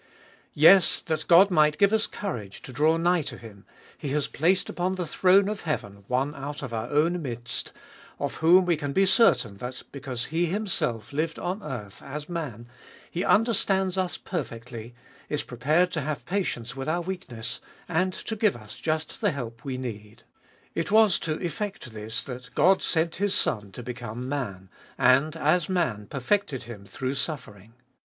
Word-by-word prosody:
Yes, 170 +5 +7
that 160 -1 -2
God 185 +3 +7
might 150 -3 +4
give 200 +1 +4
us 220 -1 +3
courage 110 - -6
to 130 - -9
draw 155 +5 +3
nigh 175 +1 +3
to - - -6
Him, 105 -4 -13 0.3
He 145 - -5
has 150 -1 +1
placed 180 +5 +1
upon 180 +2 -1
the 180 -2 -2
throne 190 +4 +4
of 210 0 -3
heaven 100 - -4
one 130 +4 0
out 145 +1 -6
of 125 -3 -5
our 110 +1 -2
own 165 +4 +2
midst, 120 -4 -5 0.5
of - - -3
whom 180 +3 +6
we 175 -1 +3
can 145 -2 -3
be 195 +4 +4
certain 130 - +4
that, 125 +4 -6
because 130 -4 -4
He 170 +1 +2
Himself 160 - -2
lived 160 +2 -1
on 185 +4 -3
earth 115 - -7
as 150 +2 -6
man, 140 -10 -5 0.4
He 175 - -1
under 225 +2 +4
stands 190 -2 +1
us 185 -2 -1
perfectly, 120 - -6 0.3
is 150 - -1
prepared 155 +9 +1
to 155 - -1
have 145 +1 -4
patience 150 - -2
with 135 +2 -4
our 170 +2 +1
weakness, 170 -11 -5 0.3
and 180 +3 +1
to 220 - -5
give 210 -2 +2
us 110 -3 -10
just 155 +4 -2
the 205 - +3
help 120 -7 -6
we 135 -3 -3
need. 110 -4 -7 0.5
It 165 - -2
was 215 -2 +5
to 155 - -1
effect 190 - -4
this 110 +1 -4
that 125 -1 -8
God 190 +1 +5
sent 165 0 0
His 200 +1 +1
Son 105 -2 0
to 125 - -7
become 120 0 -6
Man, 100 -10 -4 0.3
and 140 +5 +4
as 160 +2 +2
Man 130 - 0
perfected 145 0 -1
Him 110 -4 -10
through 130 +4 -3
suffering. 115 - -5
150 Hz, 175 wpm, -27 LUFS, 120-180 Hz, 0.5 s, Yes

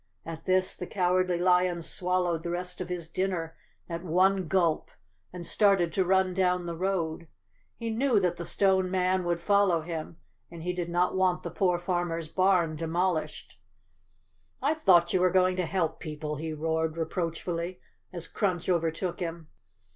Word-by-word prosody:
At 165 -1 -7
this 185 0 +2
the 180 - -6
Cowardly 185 -1 +1
Lion 180 -1 +2
swallowed 180 -1 0
the 170 - -5
rest 180 +1 -4
of 180 - -5
his 175 -2 -4
dinner 170 -2 -2 0.3
at 170 0 -5
one 185 +2 +2
gulp 170 -3 +1 0.4
and 180 -1 -7
started 195 -4 +3
to 190 - +2
run 190 0 +2
down 180 -1 +1
the 170 -1 -4
road. 170 -3 -2 0.5
He 230 -1 -3
knew 235 0 +2
that 180 -2 0
the 170 - -4
Stone 190 +1 +2
Man 185 0 +1
would 175 -1 0
follow 200 -2 +3
him 160 0 -6 0.3
and 165 -1 -9
he 180 +1 -1
did 175 -1 -3
not 175 +2 +1
want 185 -1 +1
the 170 - -5
poor 180 +1 +1
farmer's 175 -2 -2
barn 180 -2 +2
demolished. 165 +1 -2 0.5
" - - -39 0.2
I 285 +3 +2
thought 180 - +4
you 185 - +3
were 185 - +5
going 185 0 +3
to 180 -2 0
help 175 -2 -1
people," 150 -1 -5
he 160 +2 -4
roared 160 +1 -1
reproachfully, 170 +1 -3 0.3
as 170 -2 -6
Crunch 185 -3 -1
overtook 170 +1 0
him. 165 -2 -5
180 Hz, 170 wpm, -28 LUFS, 165-185 Hz, 0.5 s, were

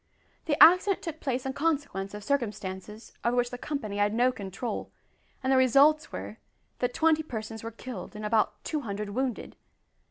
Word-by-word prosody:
The 295 -3 +1
accident 365 +3 +6
took 320 -2 -5
place 260 -2 -2
in 265 - -2
consequence 280 -11 -1
of 210 - -8
circumstances 210 -5 -3
over 240 +1 +1
which 245 0 +1
the 245 - -5
company 260 -10 -4
had 205 +1 +2
no 250 +2 +4
control, 205 +1 -5 0.5
and 260 +1 +2
the - - +5
results 280 +4 +5
were - - -6 0.4
that 245 0 -1
twenty 315 -1 +3
persons 220 -6 -6
were 230 - -5
killed 230 -3 -8
and 210 0 -5
about 215 0 +1
two 305 -2 -2
hundred 205 -3 -4
wounded! 255 +1 -3
245 Hz, 170 wpm, -28 LUFS, 210-285 Hz, 0.5 s, accident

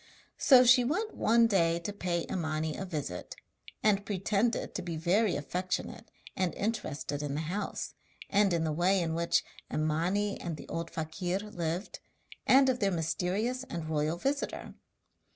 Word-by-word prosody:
So 255 -3 +7
she 250 +1 +7
went 375 - -1
one 230 +1 +4
day 170 -6 +3
to 170 +4 -5
pay 175 -4 -1
Imani 155 -3 -2
a 195 - -4
visit, 145 - -5 0.5
and 200 -2 +3
pretended 200 +3 0
to - - -3
be 170 -2 -4
very 185 +5 +2
affectionate, 180 +5 -3 0.3
and 185 -3 0
interested 175 -9 -2
in 145 -1 -3
the 155 - -1
house, 180 +6 -3 0.3
and 200 -1 +3
in 170 -2 +1
the 160 - 0
way 180 +5 +3
in 165 -2 -1
which 170 +1 +2 0.3
Imani 170 +7 0
and 170 -3 -4
the - - -10
old 165 0 -3
fakir 175 +3 -2
lived, 180 -3 -4 0.5
and 265 +1 +7
of 255 -1 +1
their 200 -4 +2
mysterious 185 +9 -1
and 165 -8 -5
royal 155 +2 0
visitor. 280 +8 -2
180 Hz, 155 wpm, -30 LUFS, 160-210 Hz, 0.5 s, So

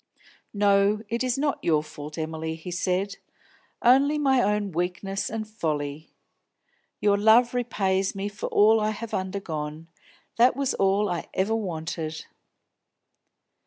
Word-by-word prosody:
"No, 200 +1 +3
it 235 +2 -1
is 255 -1 0
not 285 0 -1
your 155 -3 +2
fault, 150 0 -9
Emily," 160 0 -3
he 165 +2 -8
said. 185 +3 -1 0.7
"Only 275 +5 +5
my 270 -3 +3
own 210 -1 0
weakness 180 +3 -2
and 220 -1 -4
folly. 155 -7 -3 0.9
Your 200 -1 +2
love 225 +4 +5
repays 195 -6 0
me 195 +1 -3
for 205 0 -5
all 220 +2 +5
I 215 0 +1
have 215 +1 -6
undergone; 165 -5 -4 0.5
that 245 +2 +5
was 275 -1 0
all 195 +2 +2
I 175 - -3
ever 200 +4 +1
wanted." 160 -5 -4
200 Hz, 130 wpm, -26 LUFS, 165-220 Hz, 0.9 s, Only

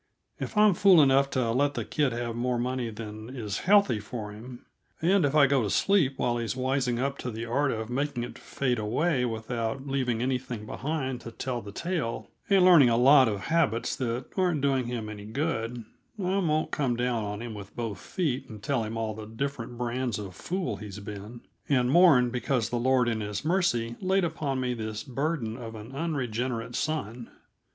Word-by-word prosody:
If - - -5
I'm 210 -1 +6
fool 190 -1 +6
enough 135 0 +4
to 125 -4 0
let 140 +4 +1
that - - -4
kid 145 -4 +2
have 120 0 -3
more 125 +1 0
money 125 0 -1
than 110 0 -8
is 110 -6 -4
healthy 200 - +5
for 105 0 -6
him, 120 +4 -10 0.3
and 180 +3 +3
if 145 0 +1
I 150 -2 +7
go 140 -1 +3
to 105 - -1
sleep 150 - +2
while 120 -1 0
he's 115 +1 -2
wising 130 -1 0
up 135 +2 -2
to 125 - -4
the 115 0 -5
art 140 +5 +1
of 110 -1 -3
making 135 -1 -1
it 120 - -8
fade 125 -4 -1
away 125 +6 +1
without 115 +2 -3
leaving 130 -4 -1
anything 125 -4 -2
behind 135 -1 -3
to - - -7
tell 125 0 -3
the 100 - -9
tale, 160 - -3 0.2
and 195 -2 +5
learning 165 -9 +8
a 115 - +3
lot 130 +1 +7
of 100 -3 -2
habits 115 -4 +1
that 125 -1 -2
aren't 180 -6 +1
doing 135 -2 +1
him 120 -3 -4
any 105 -1 -8
good, 115 -2 -2 0.3
I 190 0 0
won't 155 -4 0
come 130 -5 0
down 120 -2 0
on 105 0 -4
him 120 -1 -6
with 100 -2 -10
both 115 -4 -4
feet 140 -7 -2
and 105 -2 -10
tell 135 -5 0
him 110 +1 -4
all 110 -1 -2
the 105 0 -8
different 120 +1 -4
brands 120 -1 -2
of 100 -3 -7
fool 175 - -3
he's 105 -1 -8
been, 105 +3 -8 0.3
and 125 -3 +3
mourn 140 -8 +6
because 125 -2 0
the 120 - 0
Lord 130 0 +3
in 115 -2 0
His 105 +5 -4
mercy 155 -10 +1
laid 190 0 +2
upon 155 -5 -2
me 125 -1 0
this 110 -2 -4
burden 135 -3 -2
of 115 -3 -7
an 110 +3 -9
unregenerate 130 -6 -2
son. 125 -7 -3
125 Hz, 195 wpm, -28 LUFS, 115-140 Hz, 0.3 s, learning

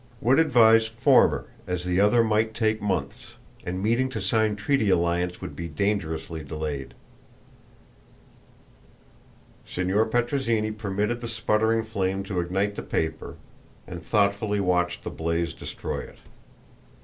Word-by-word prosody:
Would 125 +6 +3
advise 115 -7 +5
former, 115 +1 +3 0.2
as 90 -1 -2
the 90 +1 0
other 105 +4 +4
might 110 0 +1
take 110 -1 0
months, 100 -3 -3 0.3
and 90 +2 -3
meeting 120 +4 +1
to 120 -4 -4
sign 105 +2 +1
treaty 110 0 +1
alliance 90 0 +1
would - - -7
be 85 - -5
dangerously 80 -2 -2
delayed." 75 -2 -5 2.7
Signor 95 +5 0
Petrozinni 115 -2 0
permitted 105 +2 -2
the 120 - -4
sputtering 115 0 +1
flame 95 -3 -2
to 95 -2 -3
ignite 95 +4 -1
the - - -5
paper, 80 0 -3 0.5
and 85 -2 -8
thoughtfully 100 +2 +1
watched 90 -2 0
the - - -5
blaze 85 0 -2
destroy - - -5
it. - - -10
105 Hz, 125 wpm, -25 LUFS, 90-110 Hz, 2.7 s, advise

